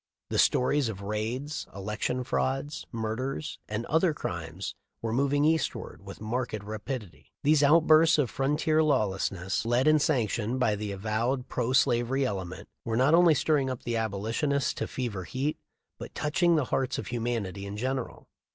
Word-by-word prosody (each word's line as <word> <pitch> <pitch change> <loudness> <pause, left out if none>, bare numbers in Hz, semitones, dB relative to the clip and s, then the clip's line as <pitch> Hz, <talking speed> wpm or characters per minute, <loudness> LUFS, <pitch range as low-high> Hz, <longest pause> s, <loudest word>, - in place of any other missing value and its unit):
The - - +1
stories 130 0 +3
of 100 -3 -6
raids, 115 +9 -3
election 105 +5 -2
frauds, 135 +3 -2
murders, 120 +6 -3
and 110 +2 -3
other 160 +1 +2
crimes 85 - -5 0.3
were 115 -1 -3
moving 140 +3 +2
eastward 160 0 -1
with - - -10
marked 110 -1 -3
ra 105 +1 -5
pidity. 100 - -6 0.2
These 150 0 +4
outbursts 155 +1 +6
of 140 -6 +1
frontier 150 +3 +1
lawlessness, 95 - 0
led 120 +4 +2
and 155 -1 +5
sanctioned 120 -3 0
by 110 -4 +2
the 105 0 -4
avowed 110 +6 -1
pro 120 - -1
slavery 130 +1 +2
element, 95 -6 -4 0.2
were 115 -1 -1
not 130 +5 +4
only 170 -2 +6
stirring 145 -3 +2
up 130 -2 -5
the 120 - -2
Abolitionists 115 +7 0
to - - -3
fever 115 -8 -4
heat, 135 - -2 0.4
but - - -9
touching 170 +3 +2
the 150 -4 +2
hearts 130 -1 0
of - - -4
humanity 115 -5 -3
in 100 +1 -6
general. 130 +2 -3
125 Hz, 160 wpm, -28 LUFS, 105-145 Hz, 0.4 s, outbursts